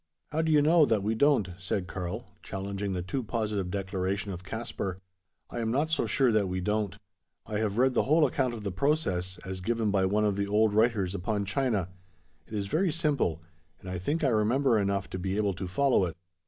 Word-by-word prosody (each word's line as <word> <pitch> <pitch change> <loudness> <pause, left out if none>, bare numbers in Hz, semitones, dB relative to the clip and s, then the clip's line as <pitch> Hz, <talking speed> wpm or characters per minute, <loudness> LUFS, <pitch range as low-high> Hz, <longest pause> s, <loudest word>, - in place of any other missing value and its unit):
"How 155 +2 +1
do 160 0 +1
you 150 -2 +5
know 160 +2 +6
that 105 -3 +1
we 110 +2 +1
don't?" 115 -6 +3
said 90 0 -2
Karl, 95 +5 -5 0.2
challenging 100 0 -4
the 90 -1 -2
too 110 +9 -2
positive 105 -5 -2
declaration 95 +1 -2
of 90 -1 -7
Caspar. 100 -3 -4 0.5
"I - - -4
am 115 -1 -1
not 145 +7 +1
so 160 - +1
sure 130 -3 +3
that 105 -3 +2
we 95 0 -2
don't. 105 +1 -1 0.5
I 105 -1 -2
have 105 -1 -1
read 130 +1 +4
the - - +2
whole 155 +2 +5
account 130 -2 0
of 110 - -8
the 100 - -2
process, 95 - 0
as 95 0 -5
given 115 +1 0
by 95 -1 +2
one 105 +2 +2
of 100 -2 +1
the 100 0 0
old 105 +1 +3
writers 110 -4 +2
upon 100 +2 -1
China. 105 -3 0 0.6
It 110 - -7
is 100 -1 -1
very 165 - +1
simple; 140 - 0 0.4
and - - -12
I 90 - -3
think 150 - -1
I 135 - +4
remember 115 +2 +3
enough 100 -1 0
to 95 - -4
be 95 +2 -2
able 105 -2 +1
to 90 +1 -5
follow 125 +1 +3
it. 85 -2 -6
105 Hz, 215 wpm, -29 LUFS, 95-125 Hz, 0.6 s, know